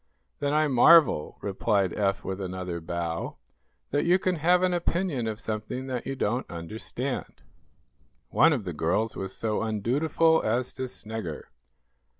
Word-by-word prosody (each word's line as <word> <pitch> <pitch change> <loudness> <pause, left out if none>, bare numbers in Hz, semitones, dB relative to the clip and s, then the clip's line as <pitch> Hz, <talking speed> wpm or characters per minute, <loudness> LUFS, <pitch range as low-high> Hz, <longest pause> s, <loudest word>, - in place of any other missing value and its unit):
"Then 145 0 0
I 155 +1 +3
marvel," 145 - +5
replied 100 -1 0
Eph, 100 -1 0
with 95 +1 -4
another 90 -2 -4
bow, 85 0 -3 0.5
"that 145 +1 +1
you 175 +2 +4
can 185 -2 0
have 175 +4 +3
an 185 -1 +2
opinion 170 -7 -1
of 110 -1 -3
something 110 +4 -4
that 130 -2 -4
you 135 - -2
don't 120 +1 -1
understand." 110 +10 -5 0.9
One 145 +10 +5
of 125 -9 -1
the 90 - -4
girls 90 +9 0
was 95 0 -4
so 110 +1 -2
undutiful 140 +9 +2
as 120 +3 0
to 130 - -4
snigger. 110 -9 -6
115 Hz, 150 wpm, -27 LUFS, 95-145 Hz, 0.9 s, marvel